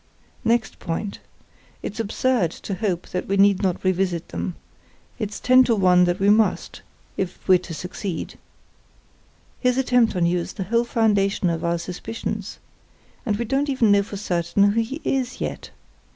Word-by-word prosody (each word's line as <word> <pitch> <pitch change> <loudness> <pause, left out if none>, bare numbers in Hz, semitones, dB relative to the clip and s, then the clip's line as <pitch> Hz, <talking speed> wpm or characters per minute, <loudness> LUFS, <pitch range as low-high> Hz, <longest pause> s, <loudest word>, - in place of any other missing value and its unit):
Next 230 0 0
point; 185 +4 -4 0.6
it's 210 - -5
absurd 225 -2 +1 0.2
to 200 - -2
hope 185 -3 -2
that 180 - -3
we 195 - 0
need 200 -1 +4
not 185 -3 -1
revisit 185 -2 0
them—it's 205 +3 -8
ten 255 0 +6
to 235 - +2
one 180 -2 +5
that 175 0 0
we 200 +1 +4
must, 215 0 +1 0.4
if 190 -2 -4
we're 185 -2 +6
to 180 -1 -8
succeed. 180 0 -5 1.2
His 250 -1 +1
attempt 245 -4 +3
on 175 -2 +2
you 175 +1 +2
is 170 - -5
the 195 - -4
whole 230 +5 +1
foundation 200 -6 +1
of 165 - -3
our 170 0 +1
suspicions. 180 +6 -5 0.7
And 205 -2 +1
we 235 - -2
don't 275 +4 0
even 240 -6 +3
know 200 0 +5
for 200 0 -7
certain 195 +1 +1
who 230 +2 +1
he 265 +8 -5
is 260 -2 -1
yet. - - -4
200 Hz, 165 wpm, -23 LUFS, 180-230 Hz, 1.2 s, ten